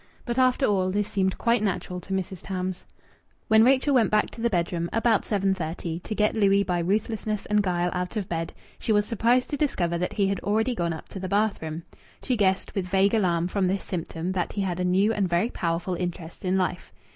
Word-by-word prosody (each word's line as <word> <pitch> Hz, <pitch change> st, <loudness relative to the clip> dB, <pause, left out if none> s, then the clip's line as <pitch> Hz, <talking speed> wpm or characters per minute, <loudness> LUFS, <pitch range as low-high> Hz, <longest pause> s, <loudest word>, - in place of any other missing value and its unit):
But 240 Hz, 0 st, -1 dB
after 255 Hz, +1 st, +3 dB
all, 190 Hz, -4 st, +2 dB
this 205 Hz, +2 st, 0 dB
seemed 190 Hz, -2 st, 0 dB
quite 235 Hz, -1 st, +2 dB
natural 180 Hz, -3 st, -2 dB
to 195 Hz, -, -12 dB
Mrs. 190 Hz, -1 st, -3 dB
Tams. 185 Hz, -1 st, -4 dB, 0.6 s
When 220 Hz, 0 st, +6 dB
Rachel 270 Hz, +3 st, +4 dB
went 240 Hz, -4 st, +4 dB
back 215 Hz, 0 st, +2 dB
to 230 Hz, -, -9 dB
the 235 Hz, -, +2 dB
bedroom, 170 Hz, -3 st, -1 dB
about 225 Hz, -1 st, +2 dB
7.30, 180 Hz, -4 st, -2 dB
to 215 Hz, -, -5 dB
get 210 Hz, 0 st, +2 dB
Louis 200 Hz, -2 st, +3 dB
by 180 Hz, -2 st, -1 dB
ruthlessness 210 Hz, +3 st, -1 dB
and 210 Hz, 0 st, +2 dB
guile 180 Hz, -2 st, 0 dB
out 180 Hz, +4 st, -3 dB
of 200 Hz, -3 st, -2 dB
bed, 165 Hz, -1 st, -3 dB, 0.3 s
she -, -, -1 dB
was 205 Hz, -1 st, +3 dB
surprised 240 Hz, +3 st, +1 dB
to 290 Hz, -, -1 dB
discover 175 Hz, -, 0 dB
that 180 Hz, -, -2 dB
he 200 Hz, -, +1 dB
had 195 Hz, -1 st, 0 dB
already 220 Hz, +4 st, 0 dB
gone 170 Hz, -7 st, -1 dB
up 160 Hz, -, -9 dB
to 195 Hz, -, -7 dB
the 185 Hz, 0 st, -4 dB
bathroom. 185 Hz, -6 st, -1 dB, 0.4 s
She 255 Hz, -, +1 dB
guessed, 190 Hz, -3 st, +1 dB
with 190 Hz, -3 st, -2 dB
vague 195 Hz, +2 st, +3 dB
alarm, 175 Hz, -6 st, +2 dB
from 190 Hz, 0 st, 0 dB
this 195 Hz, +2 st, -1 dB
symptom 175 Hz, 0 st, -4 dB
that 180 Hz, -3 st, -2 dB
he 205 Hz, -, -2 dB
had 180 Hz, -2 st, -2 dB
a -, -, 0 dB
new 190 Hz, +5 st, +3 dB
and 200 Hz, -4 st, 0 dB
very 175 Hz, +8 st, +1 dB
powerful 170 Hz, +2 st, -2 dB
interest 175 Hz, -1 st, -5 dB
in 185 Hz, 0 st, +1 dB
life. 185 Hz, -1 st, -2 dB
195 Hz, 215 wpm, -26 LUFS, 180-215 Hz, 0.6 s, When